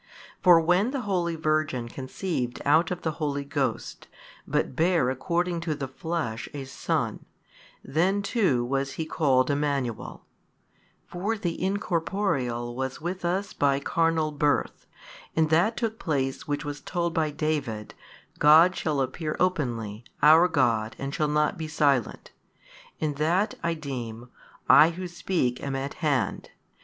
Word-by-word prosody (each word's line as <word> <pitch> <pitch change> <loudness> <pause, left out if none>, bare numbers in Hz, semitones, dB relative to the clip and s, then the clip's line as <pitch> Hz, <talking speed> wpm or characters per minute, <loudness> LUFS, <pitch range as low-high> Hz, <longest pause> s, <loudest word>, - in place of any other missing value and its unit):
For 175 -2 +7
when 180 +7 +2
the 270 -1 -3
holy 180 -6 -1
Virgin 155 -6 0
conceived 130 0 -4
out 160 +3 +4
of 180 -1 -4
the 160 - 0
Holy 145 -2 -1
Ghost, 140 - -3 0.4
but - - -1
bare 165 -5 +2
according 170 +6 -1
to 160 -2 -2
the 140 -2 -4
flesh 130 -5 -4
a 140 - -4
Son, 135 - -2 0.6
then 190 +7 +1
too 190 - +1
was 135 +2 -1
He 160 - -3
called 135 -5 +2
Emmanuel; 140 -5 -2 0.8
for 200 +6 -3
the 175 -4 -3
Incorporeal 165 - -1
was 130 0 -3
with 180 +3 -4
us 185 +4 -1
by 140 -1 +2
carnal 165 +1 +1
birth, 145 0 0 0.5
and 160 -1 +2
that 180 +8 +3
took 225 -2 -2
place 140 0 -2
which 145 0 -2
was 145 -1 -5
told 170 +1 -2
by 160 -1 +1
David, 145 -8 -3 0.5
God 160 +5 +7
shall 150 -4 -1
appear 155 +4 -3
openly, 120 - -1 0.2
our 160 +4 +7
God 115 -7 +1
and 135 0 -5
shall 150 - 0
not 150 +4 +1
be 160 - -3
silent, 145 -4 0 0.7
and 150 -2 -2
that 175 +8 +1
(I 170 0 0
deem), 125 -5 -6 0.4
I 155 - +8
Who 180 +2 -5
speak 170 -8 -1
am 140 -1 -3
at 135 +1 -3
hand. 140 - 0
155 Hz, 145 wpm, -26 LUFS, 135-175 Hz, 0.8 s, I